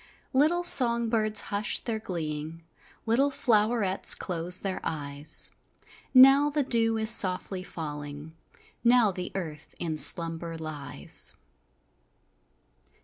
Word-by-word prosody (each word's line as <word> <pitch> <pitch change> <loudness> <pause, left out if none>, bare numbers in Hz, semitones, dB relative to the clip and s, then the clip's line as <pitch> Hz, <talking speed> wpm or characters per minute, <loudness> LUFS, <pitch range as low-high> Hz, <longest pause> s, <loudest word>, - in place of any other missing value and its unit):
Little 310 +6 +1
song 235 -7 +5
birds 215 -2 0
hush 205 +1 0
their 225 -2 -4
gleeing, 160 -4 -7 0.4
Little 245 +5 +1
flowerets 215 -6 +1
close 180 0 -3
their 195 -2 -5
eyes, 145 -1 -5 0.6
Now 270 +3 +6
the 295 0 -2
dew 225 -3 +2
is 220 +1 +4
softly 185 0 +3
falling, 150 -2 -9 0.5
Now 240 -3 +3
the 180 -1 -7
earth 160 -5 -8
in 160 -2 -5
slumber 165 +2 +1
lies. 150 - -5
190 Hz, 105 wpm, -26 LUFS, 160-235 Hz, 0.6 s, Now